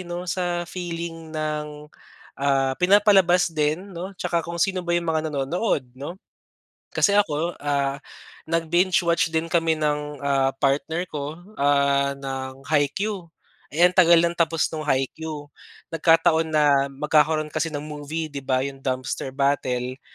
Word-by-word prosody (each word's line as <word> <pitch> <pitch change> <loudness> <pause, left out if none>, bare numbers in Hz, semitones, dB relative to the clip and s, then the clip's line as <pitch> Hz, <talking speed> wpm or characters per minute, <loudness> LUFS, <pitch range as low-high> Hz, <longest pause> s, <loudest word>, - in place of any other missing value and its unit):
'no, 175 +1 -4
sa 175 -1 -2
feeling 170 -2 -6
ng, 150 -1 -5 0.5
ah, 135 -1 +2
pinapalabas 190 -2 +4
din, 160 +6 -1
'no, 185 +3 -7
'tsaka 170 -1 -1
kung 170 +1 -6
sino 185 +2 +1
ba 175 0 0
'yong 175 - -1
mga 155 - 0
nanonood 140 - -1
'no? 140 +7 -7 0.8
Kasi 200 - +3
ako, 170 -4 +1
ah, 140 -1 -1 0.5
nag-binge-watch 170 +1 +1
din 160 +1 -1
kami 165 -2 +1
ng, 150 -1 -2
ah, 135 -1 +1
partner 160 +6 0
ko, 150 +2 -6 0.2
ah, 140 -1 +2
ng 135 0 -7
Haikyu. 170 +4 -1 0.4
Eh, 165 +4 +2
ang 180 - +5
tagal 175 -2 +6
ng 170 - +1
tapos 165 -2 +1
nung 155 - -4
Haikyu, 150 +2 -2 0.5
nagkataon 165 0 +3
na 145 -3 +3
magkakaroon 150 +2 +1
kasi 165 - -1
ng 145 -1 -5
movie, 150 +1 -5
'di 140 - -4
ba, 130 -1 0
'yong 135 -1 -6
Dumpster 130 0 -3
Battle, 130 -2 0
155 Hz, 140 wpm, -24 LUFS, 140-170 Hz, 0.8 s, tagal